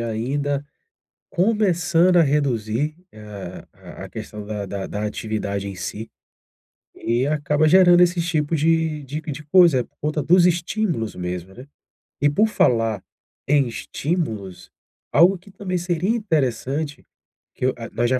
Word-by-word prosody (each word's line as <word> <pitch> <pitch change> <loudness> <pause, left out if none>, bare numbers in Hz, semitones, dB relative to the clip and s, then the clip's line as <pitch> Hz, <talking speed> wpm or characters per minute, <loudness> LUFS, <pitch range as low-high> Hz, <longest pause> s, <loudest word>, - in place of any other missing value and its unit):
ainda 135 +5 -2 0.7
começando 180 -3 +2
a 170 - +7
reduzir 140 -1 0 0.7
a - - -12
a - - -9
questão 105 -1 -8
da 105 -1 -4
da 100 0 -5
da 105 +1 -4
atividade 105 -2 -3
em 95 - -7
si, 105 +5 -6 0.8
e 120 +3 0
acaba 150 +1 +1
gerando 175 0 +6
esses 175 -1 +2
tipos 160 -1 0
de 160 -1 +1
de 145 +3 -5
de 155 -1 -7
coisa, 155 -5 +5
por - - -29
conta 150 0 -1
dos 175 +4 +5
estímulos 175 - -1
mesmo, 90 +1 -5
né. 125 +7 -12 0.6
E 145 - +4
por 205 +10 +3
falar 115 - +1 0.5
em 140 -2 +3
estímulos, 110 - -4 0.4
algo 180 +5 +5
que 185 - -18
também 185 -2 -3
seria 175 +1 -1
interessante, 150 - -1 0.5
que - - -2
eu, 130 - +2
ah, 115 -1 -8
nós 120 - 0
já 130 - +2
145 Hz, 140 wpm, -22 LUFS, 115-170 Hz, 0.8 s, a